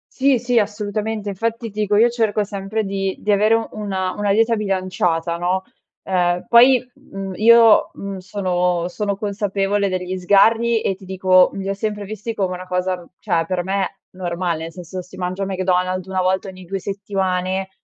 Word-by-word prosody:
Sì, 270 -2 +3
sì. 245 +1 0
Assolutamente. 210 0 -1
Infatti, 230 +4 -3
ti 210 +1 -4
dico, 210 0 +1
io 235 +3 +5
cerco 220 -3 0
sempre 200 +2 -3
di 195 -1 -2
di 210 - 0
avere 215 +3 +3
una 190 -3 -3
una 205 -1 -1
dieta 225 +2 +3
bilanciata, 185 -5 -1
no, 180 +2 0 0.4
uhm, 180 -1 0
poi, 250 +1 +6
mhmm, 195 -9 -8
io, 230 +1 +6
mhmm, 200 -1 -6
sono 180 -2 -1
sono 200 +2 -2
consapevole 200 -1 -1
degli 185 0 -3
sgarri, 220 +5 +3
e 195 - -1
ti 190 0 -15
dico, 185 -1 +4
mhmm, - - -6
li 195 - -4
ho - - 0
sempre 205 0 -3
visti 215 +3 -5
come 190 -4 -1
una 180 +1 -8
cosa, 180 -1 -2
cioè, 170 -6 0
per 180 0 -1
me 190 +1 -2
normale, 175 -2 -3
nel 165 - -6
senso 180 +1 -7
se 180 - -16
si - - -12
mangia 185 +2 -3
McDonald's 185 -1 -1
1 190 -1 -1
volta 185 +2 0
ogni 185 -1 -10
2 195 +2 -4
settimane, 190 -1 -2
195 Hz, 180 wpm, -20 LUFS, 185-210 Hz, 0.4 s, poi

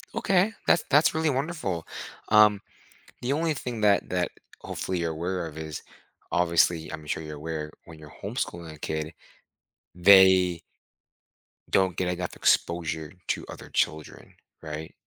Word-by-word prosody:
Okay. 195 +3 +2
That's 170 - +4
that's 145 +3 +5
really 160 0 +1
wonderful, 135 - -2 0.4
um, 105 -2 +6 0.6
the 125 +3 0
only 160 +2 +1
thing 125 -5 -5
that 100 -1 +3
that, 90 -1 -1 0.3
hopefully, 95 -1 -3
you're 85 -1 -1
aware 85 +2 -3
of 80 -1 -10
is 80 -1 -6 0.5
obviously, 85 -1 +2
I'm 80 - -7
sure - - -2
you're 75 -1 -7
aware, 75 0 -5
when 80 -2 -12
you're 75 -2 -13
homeschooling 85 -2 -4
a 75 - -15
kid, 80 +1 -3 0.8
they 95 -1 +6 1.1
don't 95 -2 +2
get 90 - -1
enough 90 0 -3
exposure 80 -2 0
to - - -2
other - - -10
children, 80 0 -2 0.3
right? 80 0 -7
90 Hz, 140 wpm, -26 LUFS, 80-105 Hz, 1.1 s, um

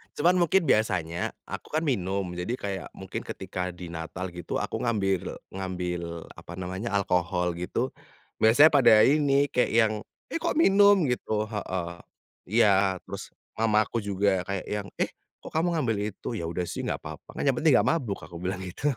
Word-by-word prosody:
cuman 175 +4 +3
mungkin 175 +2 +3
biasanya 95 - +1 0.2
aku - - -6
kan 160 - +1
minum, 100 - 0
jadi 90 +7 -3
kayak 100 -5 -4
mungkin - - -6
ketika 90 -1 -4
di 90 -1 -8
Natal 85 +3 -5
gitu, 85 -1 -6
aku - - -3
ngambil 95 -6 0 0.2
ngambil 90 -3 -4
apa 85 - -10
namanya, 95 +5 -4
alkohol 90 -2 +1
gitu, 90 +1 -2 0.5
biasanya 135 +8 +7
pada 135 -6 +6
ini 140 0 +4
kayak 125 - +2
yang, 110 -1 +4 0.4
"Eh, 330 - -1
kok - - -1
minum?" 200 - +6
Gitu. 125 -2 -2 0.2
Heeh, 95 -5 -3 0.6
iya, 100 -3 +4
terus - - -8 0.3
mama 110 -1 +3
aku 115 - -2
juga 100 -2 +1
kayak 100 -2 -3
yang, 105 -1 -3
"Eh, - - +1 0.3
kok - - -8
kamu 170 +2 +1
ngambil 120 -9 0
itu?" - - -11
"Ya 85 - -3
udah 85 +1 -2
sih, - - -4
nggak - - -2
papa, - - -9
kan - - -3
yang 135 - +4
penting 155 -3 +4
nggak - - +4
mabuk 125 -12 -1
aku 85 +2 -10
bilang 90 +1 -3
gitu. 95 +11 -2
100 Hz, 175 wpm, -27 LUFS, 90-125 Hz, 0.6 s, biasanya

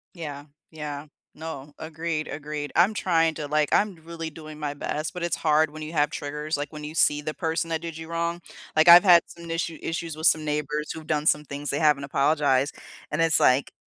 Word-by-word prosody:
Yeah. 145 -4 -7 0.3
Yeah. 150 -2 -6 0.3
No. 150 -3 -8
Agreed, 160 0 -4
agreed 145 0 -5
I'm 180 +6 +5
trying 165 -5 +1
to 150 -2 -5
like, 150 0 +1
I'm 205 -2 +2
really 165 -1 -6
doing 155 -1 -11
my 145 -1 -3
best, 150 +2 -4
but 180 - -5
it's 170 - 0
hard 155 -1 +2
when 155 - -10
you 155 +1 -6
have 150 -1 +2
triggers, 150 +1 -4
like, 145 +1 -5
when 150 -1 -8
you 150 - -7
see 150 -2 +3
the 155 - -3
person 165 0 -2
that 160 - -1
did 165 -1 -7
you 160 0 -8
wrong, 170 +1 -2 0.4
like, 155 +2 +5
I've 175 +1 +11
had 175 -3 +7
some 170 -1 -11
issue 165 -1 -3
issues 165 -1 -4
with 160 +1 -1
some 155 0 +4
neighbors 150 0 -2
who've 160 -1 -9
done 150 -1 0
some 150 -1 +3
things 145 -1 -4
they 140 - 0
haven't 150 -3 +3
apologized, 140 -1 +1 0.3
and 150 +2 0
it's 165 -1 +3
like, 130 +2 +3
155 Hz, 215 wpm, -25 LUFS, 150-165 Hz, 0.4 s, I've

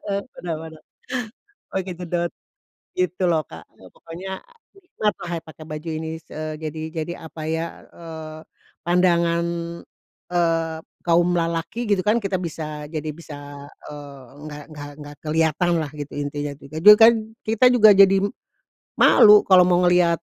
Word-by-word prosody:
heeh, 200 -1 -1 0.2
kenapa 160 -2 -5
tuh? 155 - -21 0.9
Oh 190 - 0
kejedot, 175 -1 -3 0.6
gitu 185 0 -1
loh 165 -3 +2
Kak, 80 0 -11
eee, 95 - -17
pokoknya 175 +4 -9 0.6
kenapa 210 -3 -1
saya 165 - -4
pakai 160 0 -13
baju 155 +1 -7
ini, 160 0 -5 0.2
eee, 155 0 -5
jadi 155 0 -5 0.2
jadi 170 - -5
apa 160 0 -9
ya, 160 +1 -1 0.3
eee, 160 -2 -9 0.5
pandangan, 170 -1 +2 0.9
eee, 165 -2 0 0.3
kaum 170 0 +3
lelaki 165 +5 -2
gitu 195 -2 +2
kan 225 +2 +2
kita 195 -2 -1
bisa 155 -3 -6
jadi 155 0 -3
bisa, 155 0 -10 0.6
eee, 145 -3 -10 0.2
enggak 150 -1 -8
enggak 145 -1 -8
enggak 145 -1 -10
kelihatanlah 160 0 +1
gitu 145 0 -6
intinya 145 0 -4
juga 140 +2 -12
dulu 210 +6 +9
kan 225 +1 +9 0.3
kita 225 +3 +2
juga 215 -3 +7
jadi, 195 -1 +7 0.8
malu 210 -1 +7
kalau 180 -2 +6
mau 180 0 +3
ngelihat, 175 -1 +4
165 Hz, 140 wpm, -22 LUFS, 155-180 Hz, 0.9 s, dulu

